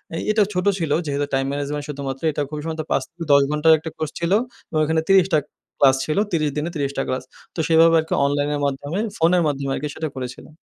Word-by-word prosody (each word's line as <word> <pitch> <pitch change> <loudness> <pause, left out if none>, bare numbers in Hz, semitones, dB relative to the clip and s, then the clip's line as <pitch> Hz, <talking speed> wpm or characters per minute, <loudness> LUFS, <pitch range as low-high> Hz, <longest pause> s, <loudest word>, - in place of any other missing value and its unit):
এ - - -2
এটাও 210 -2 +3
ছোট 180 +1 -1
ছিল 160 -3 -2
যেহেতু 145 0 -1
time 135 0 +1
management 145 +1 -3
শুধুমাত্র। 135 -2 -5
এটা 145 - -3
খুব 150 - -5
সম্ভবত 160 -1 -3
৫-১০ 160 -4 +2
ঘন্টার 150 +2 +4
একটা 160 +1 -6
কোর্স 155 -1 -3
ছিল 170 +2 -1 0.4
এবং 155 - -1
এখানে 160 +1 +1
৩০ 190 -1 +6
টা - - +5 0.4
ক্লাস 135 -1 +7
ছিল। 155 - -2
৩০ 155 -3 +1
দিনে 155 +3 -1
৩০ 140 -2 -1
টা 135 - +1
ক্লাস। 130 - -2 0.3
তো - - -5
সেভাবে 165 0 +5
আরকি 160 - -3
অনলাইনের 145 +1 0
মাধ্যমে 145 +6 -2 0.2
ফোনের 170 +2 +3
মাধ্যমে 140 -1 -2
আরকি 150 - -3
সেটা 160 - -3
করেছিলাম। 130 +3 -7
150 Hz, 210 wpm, -22 LUFS, 140-165 Hz, 0.4 s, ক্লাস